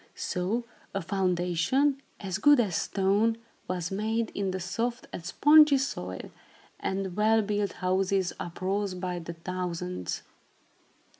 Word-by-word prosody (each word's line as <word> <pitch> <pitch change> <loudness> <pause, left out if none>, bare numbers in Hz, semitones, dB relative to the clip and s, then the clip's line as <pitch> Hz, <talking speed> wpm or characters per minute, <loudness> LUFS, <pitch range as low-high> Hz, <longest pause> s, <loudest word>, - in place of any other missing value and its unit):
So 195 +6 -1 0.3
a 195 - 0
foundation, 185 - +1 0.2
as 190 -2 -3
good 290 -2 +6
as 200 -8 +1
stone, 205 +4 +2 0.3
was 180 -1 -2
made 220 +3 -1
in 200 -1 -1
the 185 0 -2
soft 230 +7 -2
and 170 - -5
spongy 295 - +6
soil, 95 - -4 0.5
and 190 -1 -2
well 220 +1 +4
built 205 -1 -1
houses 185 0 +1
uprose 190 +3 -2
by 180 -1 -3
the 170 0 -7
thousands. 165 - -4
195 Hz, 125 wpm, -28 LUFS, 180-220 Hz, 0.5 s, good